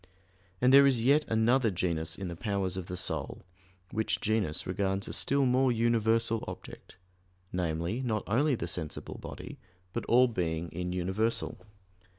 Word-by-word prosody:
And 125 +1 +4
there 140 0 +9
is 125 -4 +2
yet 145 +4 +4
another 115 +2 +3
genus 85 -3 -1
in 95 - -4
the 85 - -5
powers 100 -2 -2
of 95 -2 -5
the 90 - -5
soul, 95 - -3 0.5
which 110 0 0
genus 105 -7 0
regards 95 +1 -1
a - - -4
still 140 0 +2
more 130 +1 +3
universal 115 -1 +1
object - - -10 0.6
namely, 85 +5 -1
not 110 -5 -1
only 135 +6 +2
the 85 - -4
sensible 80 -2 -5
body, - - -8 0.3
but - - -2
all 125 +2 +5
being 85 -6 -2
in 90 +1 -4
universal. 95 +6 -1
110 Hz, 155 wpm, -30 LUFS, 90-120 Hz, 0.6 s, there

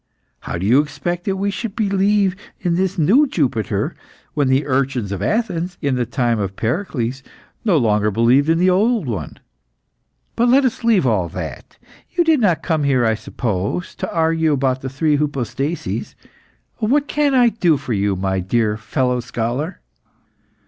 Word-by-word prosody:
How - - -5
do 90 - -3
you 125 +7 +5
expect 150 +5 -4
that 195 - 0
we 200 +1 -1
should 210 0 -5
believe 200 -2 +2 0.2
in 175 -2 0
this 190 +2 0
new 220 - +4
Jupiter, 125 - -1 0.4
when 145 -3 +1
the 130 +2 +2
urchins 130 -6 -1
of 100 - -4
Athens, 180 -6 -1
in 140 -4 0
the 125 -2 -1
time 120 -2 0
of 100 -1 -3
Pericles, 125 - -2 0.4
no 195 -7 +3
longer 105 -4 +2
believed 120 +8 +3
in 165 - +3
the 180 +2 +3
old 215 +2 +2
one? 105 - -5 1.0
"But 240 +1 +2
let 265 +2 +5
us 245 - -1
leave 220 -9 +3
all 100 -8 +1
that. 80 -6 -7 0.3
You 345 - +1
did 320 -3 +3
not 180 -8 +2
come 160 -3 0
here; 130 -4 +2
I 110 - +3
suppose, 110 - -3
to - - -5
argue 160 -1 +2
about 130 -1 0
the 130 - -4
three 145 +3 +1
hypostases. 145 +2 -3 0.6
What 270 +6 +1
can 290 -2 +1
I 245 -2 +5
do 175 -9 +2
for 125 - -4
you, 100 -1 +1
my 95 0 -1
dear 105 +3 0
fellow 125 +2 -1
scholar?" 120 +8 -3
145 Hz, 170 wpm, -19 LUFS, 115-190 Hz, 1.0 s, you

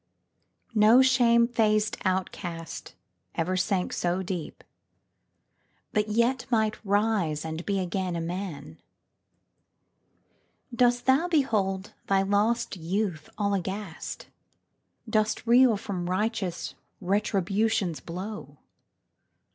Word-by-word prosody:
No 220 +4 +6
shame 235 -2 +4
faced 215 -3 +2
outcast 175 -3 -3 0.4
ever 175 +3 0
sank 185 0 0
so 180 +2 -1
deep, 180 -3 -5 1.3
But 210 0 +1
yet 235 +4 +1
might 220 -3 +1
rise 200 -7 +1
and 160 +1 -4
be 200 -1 +1
again 185 0 -2
a - - -2
man! 165 -3 -5 2.0
Dost 245 0 +3
thou 270 +7 +4
behold 210 - 0
thy 195 0 +3
lost 210 +4 +1
youth 180 -2 -2
all 200 -1 0
aghast? 190 -2 -4 0.8
Dost 215 0 0
reel 240 -1 +5
from 180 -3 -4
righteous 190 -2 -2 0.3
Retribution's 200 -1 0
blow? 180 -4 -7
200 Hz, 95 wpm, -27 LUFS, 180-225 Hz, 2.0 s, No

